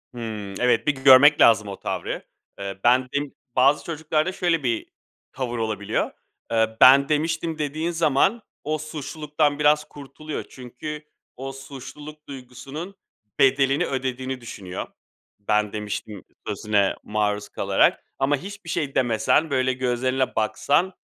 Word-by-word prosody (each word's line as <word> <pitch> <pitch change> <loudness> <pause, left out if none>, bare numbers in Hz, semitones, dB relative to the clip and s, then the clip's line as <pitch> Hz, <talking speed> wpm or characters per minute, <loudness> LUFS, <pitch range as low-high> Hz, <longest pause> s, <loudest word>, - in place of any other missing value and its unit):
Hıı. 110 -4 -5
Evet, 125 +4 +2
bir 145 - +3
görmek 135 +2 +7
lazım 105 -3 +6
o 100 - -7
tavrı. - - -4 0.4
Eee, 100 -1 -5
ben 125 +1 +4
bim 145 -1 -2 0.2
bazı 135 +3 +4
çocuklarda 160 +1 -1
şöyle 175 -5 0
bir 120 -3 -1 0.5
tavır 120 -2 -3
olabiliyor. 110 -2 -2 0.4
Eee, 110 -1 +1
"Ben 140 +2 +8
demiştim." 160 +1 0
dediğin 155 +3 -2
zaman 170 - +2 0.2
o, 155 +1 -1
suçluluktan 150 -1 -2
biraz 150 0 +4
kurtuluyor. 145 +2 -8
Çünkü 140 +4 -8 0.3
o 135 +2 -6
suçluluk 135 +3 -10
duygusunun 140 +7 -8 0.4
bedelini 135 +1 +3
ödediğini 130 -1 -3
düşünüyor, 95 -5 -7 0.5
"Ben 105 0 0
demiştim." 105 -1 -5 0.2
sözüne 100 -2 +1
maruz 105 -1 -1
kalarak. - - +2 0.2
Ama 140 +1 +2
hiçbir 200 +1 -9
şey 150 -5 -2
demesen, 125 +6 +2
böyle, 130 -1 +1
gözlerine 130 +1 -1
baksan, 145 - +1
135 Hz, 125 wpm, -24 LUFS, 120-150 Hz, 0.5 s, Ben